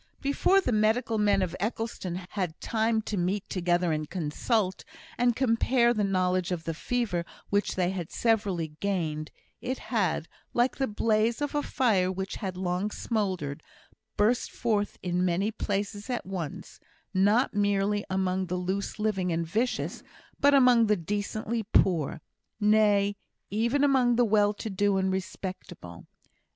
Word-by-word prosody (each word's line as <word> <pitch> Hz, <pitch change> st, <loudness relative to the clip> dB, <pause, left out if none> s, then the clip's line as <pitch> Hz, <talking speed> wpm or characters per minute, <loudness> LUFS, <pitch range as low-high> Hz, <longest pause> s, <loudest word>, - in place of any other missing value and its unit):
Before 285 Hz, +7 st, +3 dB
the 250 Hz, -, -1 dB
medical 220 Hz, +1 st, +2 dB
men 200 Hz, -2 st, +3 dB
of 180 Hz, -1 st, -3 dB
Eccleston 215 Hz, -4 st, -3 dB
had 185 Hz, 0 st, -7 dB
had 180 Hz, -6 st, -3 dB
time 220 Hz, -1 st, 0 dB
to 210 Hz, -, -3 dB
meet 185 Hz, +3 st, -1 dB
together 175 Hz, -1 st, +1 dB
and 155 Hz, -1 st, -2 dB
consult, 185 Hz, +4 st, -1 dB, 0.3 s
and 240 Hz, -1 st, +2 dB
compare 240 Hz, 0 st, +3 dB
the 215 Hz, -3 st, 0 dB
knowledge 185 Hz, -2 st, +1 dB
of 170 Hz, -3 st, -2 dB
the 165 Hz, -, -3 dB
fever 205 Hz, -1 st, -1 dB, 0.3 s
which 205 Hz, 0 st, +1 dB
they 180 Hz, -1 st, +1 dB
had 180 Hz, -4 st, -4 dB
severally 200 Hz, -8 st, 0 dB
gained, 160 Hz, -6 st, -2 dB, 0.3 s
it 255 Hz, +1 st, -2 dB, 0.2 s
had, 185 Hz, -7 st, +1 dB, 0.3 s
like 240 Hz, +2 st, +2 dB
the 270 Hz, -, 0 dB
blaze 220 Hz, +2 st, +1 dB
of 290 Hz, -1 st, -2 dB
a 295 Hz, -, +1 dB
fire 200 Hz, -11 st, +1 dB
which 190 Hz, +1 st, -4 dB
had 190 Hz, -4 st, -4 dB
long 185 Hz, +2 st, -1 dB
smouldered, 185 Hz, -11 st, -2 dB, 0.6 s
burst 225 Hz, +4 st, +2 dB
forth 210 Hz, -4 st, -1 dB
in 180 Hz, 0 st, 0 dB
many 185 Hz, +4 st, +1 dB
places 205 Hz, +1 st, -3 dB
at 245 Hz, -2 st, -2 dB
once 180 Hz, -6 st, -6 dB, 0.3 s
not 205 Hz, +7 st, +3 dB
merely 205 Hz, 0 st, +1 dB
among 190 Hz, 0 st, 0 dB
the 180 Hz, -, -2 dB
loose 190 Hz, +2 st, -3 dB
living 200 Hz, -4 st, 0 dB
and 165 Hz, 0 st, 0 dB
vicious, 225 Hz, +10 st, -1 dB, 0.4 s
but 285 Hz, 0 st, +5 dB
among 250 Hz, -4 st, +6 dB
the 210 Hz, 0 st, +3 dB
decently 210 Hz, +5 st, -2 dB
poor 175 Hz, -7 st, +1 dB, 0.4 s
nay, 205 Hz, -1 st, +3 dB, 0.3 s
even 235 Hz, +7 st, +1 dB
among 260 Hz, -4 st, +4 dB
the 245 Hz, 0 st, +4 dB
well 205 Hz, -1 st, +3 dB
to 210 Hz, +1 st, -6 dB
do 200 Hz, +1 st, +2 dB
and 190 Hz, 0 st, +1 dB
respectable. 185 Hz, -, -6 dB
205 Hz, 150 wpm, -28 LUFS, 185-225 Hz, 0.6 s, among